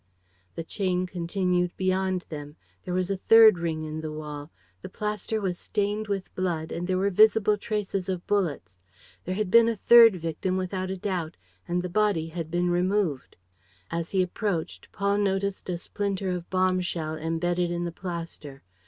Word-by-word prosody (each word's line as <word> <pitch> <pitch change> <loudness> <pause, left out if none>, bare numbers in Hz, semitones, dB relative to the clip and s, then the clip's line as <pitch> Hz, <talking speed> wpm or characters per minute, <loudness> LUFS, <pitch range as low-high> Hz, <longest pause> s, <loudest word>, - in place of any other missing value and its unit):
The 165 - -4
chain 185 0 -1
continued 180 0 -1
beyond 185 -1 0
them. 145 -1 -7 0.3
There 180 - -3
was 185 +1 0
a 195 - -1
third 220 -1 +7
ring 160 -2 -2
in 155 0 -5
the 155 -1 -5
wall. 150 -1 -7 0.3
The - - -8
plaster 210 +2 -3
was 185 -4 -2
stained 210 +1 -1
with 195 -2 -3
blood 170 -4 -2
and 175 +1 -3
there 185 -1 +1
were 200 +2 +1
visible 215 +1 +5
traces 205 -3 -3
of 180 -2 -3
bullets. 150 - -1 0.5
There 185 - -2
had 205 -2 -2
been 230 0 +7
a 230 - -1
third 230 0 +7
victim, 170 +2 -2
without 185 0 -3
a 190 - -3
doubt, 180 -4 -3 0.3
and 175 +1 -1
the - - -2
body 180 -4 +1
had 165 -1 -5
been 175 +1 0
removed. 180 -5 0 0.5
As 170 0 -2
he 190 -2 +2
approached, 180 -2 -3
Paul 200 0 0
noticed 195 -1 -1
a 175 - -1
splinter 195 +1 -3
of 180 -1 -5
bomb 185 -1 +2
shell 160 -3 -3
embedded 170 +2 -1
in 175 0 -2
the 170 - -3
plaster. 165 -6 -7
185 Hz, 175 wpm, -26 LUFS, 170-200 Hz, 0.5 s, third